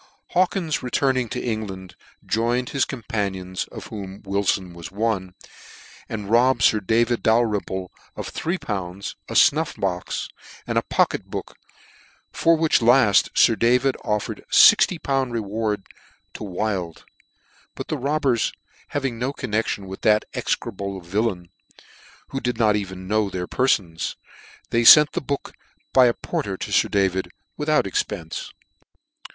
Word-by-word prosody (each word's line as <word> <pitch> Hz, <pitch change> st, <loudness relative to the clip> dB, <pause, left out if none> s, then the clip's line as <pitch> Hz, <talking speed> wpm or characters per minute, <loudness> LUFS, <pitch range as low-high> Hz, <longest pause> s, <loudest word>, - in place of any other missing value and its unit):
Hawkins 180 Hz, -3 st, 0 dB
returning 130 Hz, -1 st, 0 dB
to 125 Hz, -, -3 dB
England, 95 Hz, -6 st, -5 dB, 0.3 s
joined 120 Hz, +3 st, 0 dB
his 140 Hz, -, +1 dB
companions, 100 Hz, -7 st, -4 dB
of -, -, -8 dB
whom 100 Hz, -2 st, -8 dB
Wilfon 95 Hz, -2 st, -1 dB
was 85 Hz, -1 st, -9 dB
one, 100 Hz, -3 st, -2 dB, 0.7 s
and 105 Hz, -3 st, -5 dB
rob^ 120 Hz, +4 st, +4 dB
bed 115 Hz, -, -2 dB
Sir 110 Hz, -, +5 dB
David 115 Hz, +4 st, +1 dB
Dalrymple 105 Hz, -5 st, 0 dB, 0.2 s
of -, -, -5 dB
about -, -, -14 dB
three 170 Hz, +4 st, -2 dB
pounds, 100 Hz, -, -5 dB
a -, -, -5 dB
fnuff 155 Hz, +2 st, +3 dB
box, 90 Hz, -2 st, -2 dB, 0.4 s
and -, -, +1 dB
a -, -, -3 dB
pocket -, -, 0 dB
book, -, -, -7 dB, 0.8 s
for 165 Hz, 0 st, +3 dB
which 160 Hz, -4 st, +2 dB
laft 115 Hz, -4 st, +5 dB
Sir 115 Hz, -, +5 dB
David 125 Hz, +4 st, +2 dB
offered 105 Hz, -1 st, -2 dB
6ol. 135 Hz, -7 st, +5 dB
reward 105 Hz, -2 st, -2 dB, 0.5 s
to -, -, -8 dB
Wild; 95 Hz, -3 st, -3 dB, 0.7 s
but -, -, -6 dB
the -, -, -1 dB
robbers 140 Hz, -3 st, 0 dB, 0.3 s
having 135 Hz, -5 st, -3 dB
no 130 Hz, +3 st, -1 dB
connection 110 Hz, -6 st, -2 dB
with 95 Hz, 0 st, -8 dB
that 105 Hz, 0 st, +3 dB
execrable 100 Hz, -3 st, -3 dB
villain, 90 Hz, 0 st, -2 dB, 0.8 s
who 135 Hz, -, -3 dB
did 125 Hz, -1 st, -2 dB
not 110 Hz, -3 st, +3 dB
even 95 Hz, -2 st, -5 dB
know 105 Hz, 0 st, +1 dB
their 90 Hz, -2 st, -4 dB
perfons, 90 Hz, -9 st, 0 dB, 0.6 s
they 115 Hz, -, +2 dB
fent 150 Hz, +5 st, +9 dB
the -, -, -3 dB
book 140 Hz, 0 st, -4 dB, 0.4 s
by 130 Hz, -2 st, +7 dB
a 120 Hz, -, +1 dB
porter 95 Hz, -2 st, -4 dB
to -, -, -6 dB
Sir -, -, +3 dB
David, 95 Hz, -2 st, 0 dB, 0.3 s
with 150 Hz, 0 st, -3 dB
out 155 Hz, -, +3 dB
expence. 415 Hz, 0 st, -3 dB
110 Hz, 140 wpm, -23 LUFS, 95-125 Hz, 0.8 s, fent